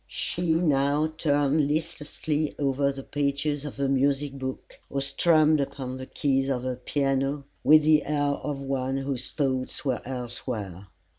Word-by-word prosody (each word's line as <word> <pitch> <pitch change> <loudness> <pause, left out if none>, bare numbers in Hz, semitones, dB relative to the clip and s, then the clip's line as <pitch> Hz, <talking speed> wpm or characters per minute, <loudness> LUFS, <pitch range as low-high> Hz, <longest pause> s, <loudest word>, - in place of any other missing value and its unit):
She 170 -2 -1
now 150 -1 +2
turned 145 -1 +2
listlessly 155 -1 -2
over 140 0 +1
the 135 0 -8
pages 145 +1 -1
of 145 - -6
her 140 -1 0
music 135 +1 +1
book, 130 -1 -6
or 140 - -2
strummed 155 +1 +3
upon 130 -2 -4
the 130 0 -7
keys 135 -2 0
of 125 -2 -1
her 130 -1 -2
piano, 135 +2 0 0.2
with 155 0 +7
the 155 -1 +4
air 145 -1 +1
of 140 -1 -4
one 135 -1 -1
whose 135 -2 -3
thoughts 130 -2 -2
were 130 -3 0
elsewhere. 120 -7 -5
140 Hz, 150 wpm, -26 LUFS, 135-150 Hz, 0.2 s, with